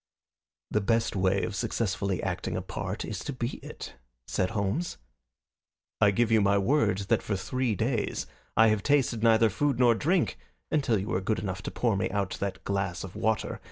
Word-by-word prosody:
"The 105 - +2
best 115 +3 +1
way 95 +1 +2
of 110 - -3
successfully 100 -3 -1
acting - - -2
a - - -2
part - - -4
is - - -4
to - - -4
be 125 -2 -3
it," - - -9 0.3
said 90 - 0
Holmes. 110 - -2 1.0
"I 105 - +7
give 115 +3 +1
you 110 -1 +5
my 100 0 +3
word 105 -2 +2
that - - +3
for 105 - -2
three 125 +4 -1
days 115 +1 -1 0.3
I 110 0 +7
have 110 -1 +1
tasted 135 -4 +2
neither 115 -1 +5
food 140 +4 +1
nor 120 -2 +5
drink 165 +9 +1 0.3
until 135 -7 +2
you 100 +1 -3
were 90 - 0
good 110 +3 0
enough 95 -2 -4
to - - -4
pour 115 -4 0
me 95 - 0
out 100 -1 -1
that 100 -1 -3
glass 95 -3 -2
of 95 -1 -8
water. 110 -1 -1
110 Hz, 190 wpm, -28 LUFS, 100-120 Hz, 1.0 s, I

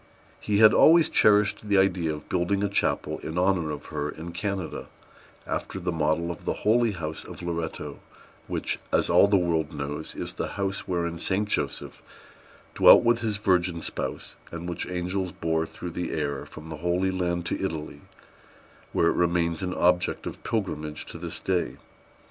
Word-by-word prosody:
He 105 -1 0
had 110 0 +8
always 165 0 +6
cherished 105 0 +3
the 100 - +4
idea 90 -4 +2
of 75 -1 -7
building 95 +3 0
a 100 - +1
chapel 100 - 0
in 80 - -6
honor 90 -3 +2
of 75 -1 -5
her 75 -1 -2
in 80 +3 -7
Canada, 95 0 -4 0.6
after 95 - -3
the 90 0 -2
model 80 +1 0
of 85 - -9
the - - 0
Holy 115 +1 +4
House 80 -3 -5
of - - -10
Loretto, 85 -4 -4 0.5
which, - - -1
as - - +2
all - - +7
the 100 -1 +4
world 85 -4 0
knows, 75 0 -5
is - - -5
the - - -3
house 100 0 -2
wherein 85 -2 -2
Saint 100 +4 -1
Joseph - - -2 0.7
dwelt - - +8
with 120 0 +3
his 110 -3 -1
virgin 90 -4 +1
spouse, - - -4 0.2
and 85 +1 -6
which 85 -2 -3
angels 90 +1 -2
bore 80 -1 -1
through 90 +1 -7
the 90 +1 -3
air 70 -3 -2
from 80 +1 -11
the 80 - -6
Holy 90 +4 0
Land 90 -2 -1
to - - -2
Italy, 75 -5 -4 0.9
where 85 - +3
it - - +2
remains 85 -1 +1
an 90 -1 -2
object 90 0 +2
of - - -7
pilgrimage 75 -9 -3
to 85 - -9
this 85 -1 -6
day. 85 -9 -1
85 Hz, 175 wpm, -26 LUFS, 80-95 Hz, 0.9 s, had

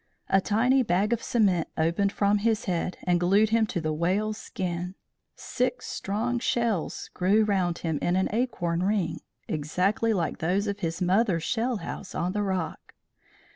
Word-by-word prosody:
A 195 - +4
tiny 250 +7 +3
bag 205 0 +1
of 230 - -1
cement 195 -8 +2
opened 170 +5 +1
from 205 0 +2
his 225 +1 +1
head 180 -1 -2
and 175 -1 +2
glued 200 +5 +3
him 225 -1 +3
to 190 - -2
the 155 -1 -1
whale's 200 +7 0
skin. 180 0 -4 0.4
Six 250 0 -2
strong 230 +5 -2
shells 235 -7 -1
grew 200 +4 +3
round 185 -5 +1
him 160 -3 -2
in 175 - +1
an 190 - +2
acorn 175 -8 0
ring, 195 -2 0 0.3
exactly 180 +9 0
like 180 -6 -1
those 185 +5 +1
of 205 -1 -3
his 165 0 -2
mother's 185 -2 +2
shell 240 +3 0
house 200 -1 -7
on 180 - -1
the 205 +2 -1
rock. 190 -5 -3
195 Hz, 165 wpm, -27 LUFS, 175-220 Hz, 0.4 s, A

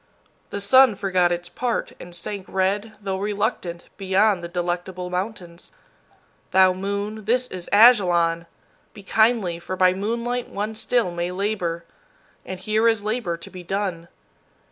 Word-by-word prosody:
The 200 - -4
sun 255 +3 +6
forgot 185 -3 +1
its 175 0 -2
part, 245 +5 -2
and 175 0 -10
sank 190 +2 -5
red, 200 +3 0
though 195 -2 -3
reluctant, 200 -4 -2
beyond 195 -1 +2
the - - -4
Delectable 175 +1 -3
Mountains. 180 -2 -5 0.8
Thou 185 -1 +5
moon, 200 +3 -4
this 245 +3 +2
is 180 -2 -7
Ajalon! 175 -7 +5 0.5
Be 205 - -11
kindly, 220 -5 +2
for 180 +2 -5
by 185 -1 +4
moonlight 235 +5 -2
one 210 +2 -3
still 225 -2 0
may 175 0 -2
labor, 180 -3 -2 0.6
and 185 -1 -7
here 215 +4 +1
is 225 -3 +2
labor 210 -6 -2
to 170 - -11
be 185 - -9
done. 180 -2 -3
195 Hz, 145 wpm, -23 LUFS, 175-215 Hz, 0.8 s, sun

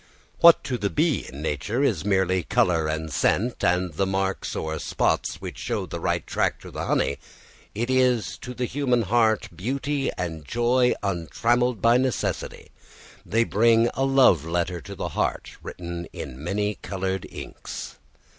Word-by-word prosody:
What 170 -1 +8
to 125 -2 -3
the 100 - 0
bee 155 +3 +1
in 70 +3 -8
nature 95 - -1
is 105 - +1
merely 95 -2 +2
colour 80 -1 +2
and 80 0 -3
scent, 110 - +1
and 90 -1 +1
the 95 +5 0
marks 95 0 -1
or 80 0 -3
spots - - 0
which - - -8
show - - -2
the - - -6
right - - -1
track - - 0
to - - -10
the - - -4
honey, 70 - +1 0.6
is 125 -3 +1
to 125 0 -7
the 125 - -1
human 125 -2 +1
heart 110 0 +2
beauty 135 - -1
and 80 -3 -4
joy 120 - +2
untrammelled 110 - 0
by 115 +1 +6
necessity. 130 -1 -2 0.5
They 115 +6 +2
bring 115 +1 +3
a 135 - -1
love 135 - +5
letter 85 +1 -2
to - - -9
the - - -4
heart - - -2
written 85 -1 -6
in 65 +3 -8
many 105 +4 -1
coloured 95 -1 -3
inks. - - -8
105 Hz, 155 wpm, -25 LUFS, 85-125 Hz, 0.6 s, What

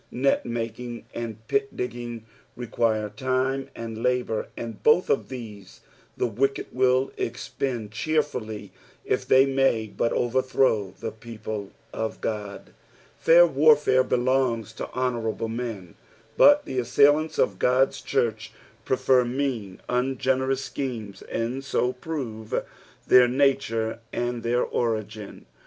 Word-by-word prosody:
Net 135 +3 +1
making 120 +1 -5
and 110 -2 -6
pit 205 0 -1
digging 120 -2 -5 0.3
require 115 -3 0
time 130 +3 -1
and 115 -1 -6
lAMur, 125 -3 0
and 115 -2 -6
both 155 +5 +4
of - - 0
these 110 -7 -9 0.4
the - - +1
wicked 135 +4 -1
wjll 130 +1 +2
exiicnd 120 -1 -3
cheerfully 125 -5 -2 0.3
if - - -1
they 130 +1 +6
may 135 -5 +2
but 115 +2 -1
overthrow 125 -5 +1
the - - -4
people 110 -2 -7 0.2
of 110 0 -3
Ood. 105 -2 -5 0.5
Fair 170 +1 +7
warfare 145 -4 +4
belongs 125 -3 0
to - - -6
honourable 115 -3 -2
men, 115 -7 -5 0.4
but 290 0 +6
the 130 - -2
assailants 145 +6 +3
of 95 -2 +1
God's 130 +2 +2
church 110 -1 -1 0.3
prefer 130 +1 +3
mean, 120 -6 -3
ungenerous 130 +1 0
schemes, 115 -7 -5
and 120 +4 -3
bo 125 +1 +1
prove 125 -6 -4 0.4
their 125 -1 +7
nature 125 -4 +1
and 120 0 -2
their 120 +1 +1
ori^n. 110 -3 -3
120 Hz, 120 wpm, -25 LUFS, 110-130 Hz, 0.5 s, Fair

